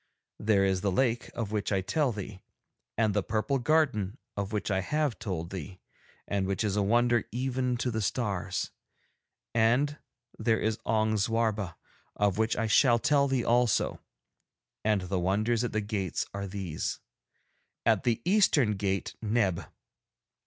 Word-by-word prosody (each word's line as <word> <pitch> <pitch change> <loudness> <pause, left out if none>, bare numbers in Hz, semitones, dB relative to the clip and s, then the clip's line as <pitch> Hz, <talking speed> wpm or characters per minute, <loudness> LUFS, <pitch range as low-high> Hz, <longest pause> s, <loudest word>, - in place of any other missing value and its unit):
There 105 -2 +3
is 95 -1 +1
the 100 - +1
lake, 120 +3 +1
of 110 -3 -3
which 105 -1 -1
I 95 -1 +2
tell 140 - +1
thee, 100 -2 -7 0.6
and 110 -2 +2
the 105 - +2
purple 110 +7 0
garden 120 -7 +1 0.2
of 100 0 -3
which 105 -1 -2
I 95 -1 +1
have 150 0 -1
told 85 -4 -4
thee 95 0 -7 0.5
and 100 -2 0
which 100 +2 -1
is 105 -2 0
a 105 - +2
wonder 120 +3 +3
even 125 +1 -1
to 125 +1 -1
the 110 -1 -1
stars, 100 -2 -2 0.8
and 125 +6 +2 0.4
there 110 -2 +2
is 110 0 -1
Ong 110 0 +2
Zwarba, 105 -3 0 0.4
of 105 0 +1
which 110 0 +1
I 115 - +1
shall 120 +3 +5
tell 140 +2 +3
thee 130 -3 0
also. 120 -1 +2 0.8
And 105 -2 +2
the 90 0 -2
wonders 110 +6 +1
at 120 - -1
the 110 - 0
gates 100 -4 -2
are 100 0 -4
these. 95 -5 -4 0.9
At 110 -3 +3
the 115 -1 0
eastern 155 - +3
gate 95 -1 -2
Neb. 105 -5 0
110 Hz, 155 wpm, -29 LUFS, 100-120 Hz, 0.9 s, shall